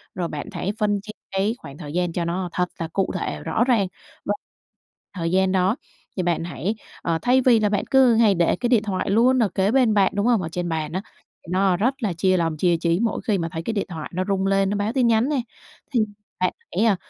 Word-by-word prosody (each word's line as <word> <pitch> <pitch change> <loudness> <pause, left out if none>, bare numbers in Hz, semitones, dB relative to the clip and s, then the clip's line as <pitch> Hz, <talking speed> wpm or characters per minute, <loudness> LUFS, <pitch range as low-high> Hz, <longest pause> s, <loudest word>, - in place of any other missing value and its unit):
Rồi 175 -2 -1
bạn 150 -3 -6
hãy 195 - -2
phân 205 -2 +1
chia 215 - -9 0.2
cái 195 +4 0
khoảng 140 -2 -11
thời 150 -3 -8
gian 175 0 0
cho 170 0 -1
nó 175 +2 -2
thật 180 - +1
là 165 - -2
cụ 195 - +1
thể, 75 - -3
rõ 225 - +1
ràng. 235 -6 +2 0.4
Và 205 - +1 0.8
thời 165 -3 -2
gian 190 0 +3
đó 190 +3 +2 0.4
thì 185 - 0
bạn 175 -1 0
hãy, 180 +5 -3 0.3
ờ, 165 -1 0
thay 255 +1 +4
vì 240 -3 +5
là 210 -1 +2
bạn 200 -1 0
cứ 260 -3 +6
hay 220 -3 +4
để 170 -1 +2
cái 240 - -2
điện 235 -4 +4
thoại 190 -3 -2
luôn 245 +5 +4
ở 210 - +1
kế 190 +3 +1
bên 250 -4 +4
bạn, 200 -2 +3
đúng 205 +1 +1
hông? 235 -5 +3
Ở 165 - -4
trên 175 +1 -3
bàn 160 -1 -2
á, 185 - -1 0.4
thì 165 - -10
nó 185 -1 +2
rất 250 +8 +1
là 200 -5 0
chia 185 +2 +2
lòng, 165 -2 0
chia 175 +1 +2
trí 170 +1 +1
mỗi 225 0 0
khi 210 -3 +2
mà 165 -2 -2
thấy 165 - -4
cái 225 - -2
điện 200 - -1
thoại 160 -4 -6
nó 185 +2 0
rung 195 -1 0
lên, 195 0 +2
nó 205 - -1
báo 205 +3 -1
tin 255 -3 +3
nhắn 230 +3 +3
nè, 285 -4 +1 0.5
thì 250 - +2 0.4
bạn 185 - +1 0.2
hãy, 210 +5 +3
à, 215 -3 +4
195 Hz, 255 wpm, -23 LUFS, 175-220 Hz, 0.8 s, cứ